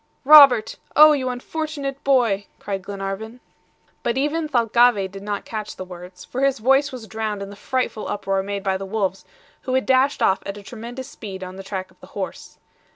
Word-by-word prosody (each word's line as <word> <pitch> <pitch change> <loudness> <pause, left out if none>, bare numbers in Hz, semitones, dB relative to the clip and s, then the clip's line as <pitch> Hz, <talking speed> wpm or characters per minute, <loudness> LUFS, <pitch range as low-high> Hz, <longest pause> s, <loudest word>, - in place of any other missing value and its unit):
"Robert! 275 -6 +8 0.2
oh 305 +1 +9
you 265 -4 0
unfortunate 280 +1 -4
boy," 235 -7 +2
cried 195 -2 -4
Glenarvan. 200 +4 -6 0.6
But 235 +1 -1
even 300 +3 0
Thalcave 235 -5 +3
did 195 0 -9
not 205 0 -4
catch 215 -2 -6
the 185 - -7
words, 180 0 -11
for 255 - -5
his 275 0 +2
voice 270 +5 +3
was 250 -4 -8
drowned 215 -1 -4
in 200 - -8
the - - -10
frightful 250 0 -2
uproar 195 -1 -1
made 200 0 -4
by 190 -1 0
the 195 - -6
wolves, 195 -2 -2 0.4
who 255 -1 -2
had 260 - +1
dashed 265 +1 +2
off 190 - +3
at 200 +1 -6
a 205 - -11
tremendous 240 +4 -8
speed 190 -4 -8
on 185 0 -8
the 195 - -8
track 190 -1 -6
of - - -27
the - - -14
horse. - - -6
220 Hz, 195 wpm, -22 LUFS, 195-260 Hz, 0.6 s, oh